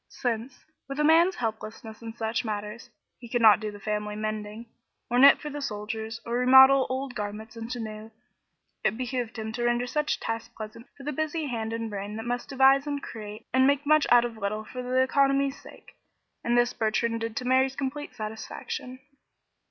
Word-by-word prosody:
Since, 245 +1 -4 0.2
with 275 +1 -5
a - - +3
man's 335 +4 +5
helplessness 220 -1 -5
in 225 -1 -7
such 225 -1 -1
matters, 210 0 -5 0.3
he 235 - -11
could 240 0 0
not 215 -2 +8
do 215 -1 -4
the 205 - -11
family 210 0 -3
mending, 215 +1 -4 0.5
or 245 - +3
knit 280 +2 +9
for 300 - -6
the 290 +1 -5
soldiers, 220 -1 -4
or 235 +1 -1
remodel 265 +1 +7
old 260 0 -3
garments 215 +1 -6
into 230 +2 -5
new, 215 -1 -7 0.7
it 220 - +1
behooved 245 -2 -3
him 220 0 -4
to 240 +2 -3
render 240 0 +1
such 300 +4 -1
tasks 225 +1 -4
pleasant 220 +3 -8
for 275 - -11
the 295 - -2
busy 315 +2 -2
hand 225 -4 -3
and 230 -1 -3
brain 205 +1 -5
that 225 +1 -6
must 245 0 -3
devise 270 +1 +4
and 285 -1 -3
create 215 -1 -8
and 260 +1 +5
make 285 +1 +2
much 305 +1 +4
out 240 0 +6
of 235 -2 -6
little 215 +1 -3
for 255 +1 0
economy's 275 +1 +2
sake; - - -15 0.5
and 240 +1 +2
this 240 0 +3
Bertrand 230 0 0
did 225 -1 -3
to 250 - -3
Mary's 260 +1 +3
complete 285 +2 -4
satisfaction. 220 +3 -6
235 Hz, 190 wpm, -27 LUFS, 220-265 Hz, 0.7 s, knit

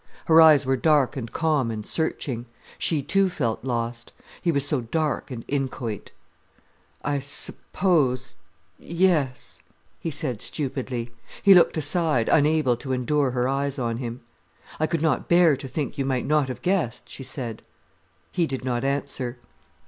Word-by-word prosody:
Her 165 -2 +7
eyes 155 -3 +7
were 130 0 +1
dark 150 -1 +3
and 120 -4 -5
calm 155 -7 +1
and 110 -2 -5
searching. 130 -6 -2 0.3
She 150 -4 0
too 195 +6 +2
felt 120 -12 -2
lost. 120 -2 -3 0.3
He 170 - +2
was 140 -3 +1
so 145 -2 0
dark 150 +5 -2
and 120 -3 -7
inchoate. 130 -6 -3 0.9
"I 145 0 0
suppose—yes," 135 - -1 0.4
he 165 - -3
said 140 -7 -3
stupidly. 130 -4 -3 0.3
He 200 - +8
looked 175 -2 +5
aside, 155 -5 +1
unable 150 -4 +3
to 130 +1 -4
endure 135 +2 +1
her 125 0 0
eyes 140 +1 -1
on 115 -3 -2
him. 120 0 -5 0.6
"I 155 - +2
could 165 -1 -1
not 160 - 0
bear 170 -3 +5
to 135 +1 -8
think 140 +2 -4
you 135 - 0
might 130 -2 -1
not 150 -2 +2
have 130 - -7
guessed," 180 - -1
she 135 - -8
said. 125 -4 -5 0.7
He 170 -3 +1
did 130 -2 -4
not 120 -1 -1
answer. 135 -3 -2
135 Hz, 150 wpm, -24 LUFS, 125-155 Hz, 0.9 s, He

